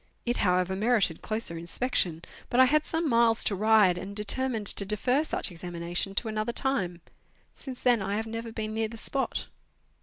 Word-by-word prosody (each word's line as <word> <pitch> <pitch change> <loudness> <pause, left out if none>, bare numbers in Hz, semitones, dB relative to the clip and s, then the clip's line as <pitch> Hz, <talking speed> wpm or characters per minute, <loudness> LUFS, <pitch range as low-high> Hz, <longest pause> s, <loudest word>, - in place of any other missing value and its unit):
It 240 0 0
however 180 0 +1
merited 210 -5 +1
closer 215 -7 -2
inspection, 170 -2 -1 0.3
but 245 - +1
I 260 - +9
had 305 +3 +2
some 325 0 -1
miles 230 -3 +3
to - - +1
ride, 210 -3 +4
and 200 +1 -7
determined 220 +2 0
to 200 - +2
defer 245 +8 +1
such 310 - -2
examination 175 +2 -4
to 225 - 0
another 215 +2 -2
time. 190 -12 -1 0.5
Since 260 -2 -9
then 245 -4 +4
I 200 +1 -2
have 220 +1 -2
never 225 +1 -5
been 215 -1 -4
near 220 0 0
the 230 +1 -10
spot. 270 +4 -2
220 Hz, 180 wpm, -28 LUFS, 190-245 Hz, 0.5 s, I